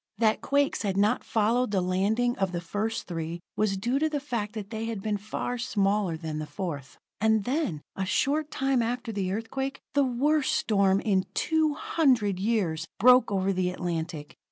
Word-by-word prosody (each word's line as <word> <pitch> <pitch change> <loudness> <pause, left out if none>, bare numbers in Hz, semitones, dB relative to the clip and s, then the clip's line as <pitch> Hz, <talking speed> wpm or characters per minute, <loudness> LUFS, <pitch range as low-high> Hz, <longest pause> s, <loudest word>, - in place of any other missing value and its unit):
That 220 -2 +2
quakes 285 0 +1
had 195 -2 -1
not 205 +2 +2
followed 230 +3 +1
the 200 -2 +1
landing 205 +7 +1
of 190 -2 0
the 175 - -1
first 210 +6 -3
three 165 0 -4 0.2
was 210 -2 +1
due 240 +8 0
to 315 +1 +2
the 295 -2 -1
fact 235 -7 -3
that 210 -2 -6
they 220 0 -3
had 225 -3 -3
been 210 +1 -1
far 215 +4 -4
smaller 200 -6 +1
than 155 -2 -4
the 155 - -5
fourth. 145 -3 -5 0.2
And 220 0 +3
then, 245 - -1
a 195 - -2
short 285 +10 +1
time 270 -3 +1
after 235 0 -2
the 195 -3 -2
earthquake, 265 +6 -3
the 285 0 +4
worst 275 +3 +1
storm 200 -2 +2
in 190 -3 +1
two 315 -2 +2
hundred 270 - +2
years 185 -7 0
broke 250 +1 +6
over 195 0 +1
the 185 -1 0
Atlantic. 165 -4 -4
210 Hz, 180 wpm, -27 LUFS, 185-250 Hz, 0.2 s, broke